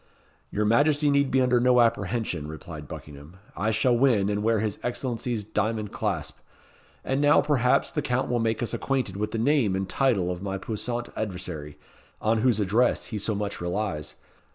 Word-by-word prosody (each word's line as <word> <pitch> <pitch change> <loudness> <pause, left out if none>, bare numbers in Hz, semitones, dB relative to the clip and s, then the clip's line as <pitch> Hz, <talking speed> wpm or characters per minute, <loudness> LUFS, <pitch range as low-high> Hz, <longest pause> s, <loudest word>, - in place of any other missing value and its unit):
"Your 105 +1 -1
Majesty 145 +6 +3
need 140 -1 +3
be 130 0 +3
under 125 -1 +3
no 125 0 +4
apprehension," 105 -8 0
replied 75 -1 -8
Buckingham. 75 +6 -10 0.2
"I 105 - 0
shall 120 +3 +2
win 115 -6 +3
and 105 0 -1
wear 110 0 +2
his 105 -1 -2
Excellency's 120 -2 -2
diamond 110 0 -2
clasp. - - -3 0.7
And 135 +2 0
now, 145 0 +5
perhaps, 125 -4 +2
the 150 - -1
Count 130 -1 0
will 120 - 0
make 115 0 0
us 120 - -2
acquainted 130 -8 -1
with 105 +1 -2
the 115 - -3
name 115 -5 +2
and 95 0 -2
title 100 -6 +1
of 90 0 -5
my 95 -1 -3
puissant 120 +4 -4
adversary, 90 -8 -5 0.4
on 110 +1 +1
whose 120 -3 +3
address 110 +5 +2
he 105 - -1
so 105 +2 -1
much 100 -2 -4
relies. 85 -4 -3
110 Hz, 175 wpm, -26 LUFS, 100-125 Hz, 0.7 s, now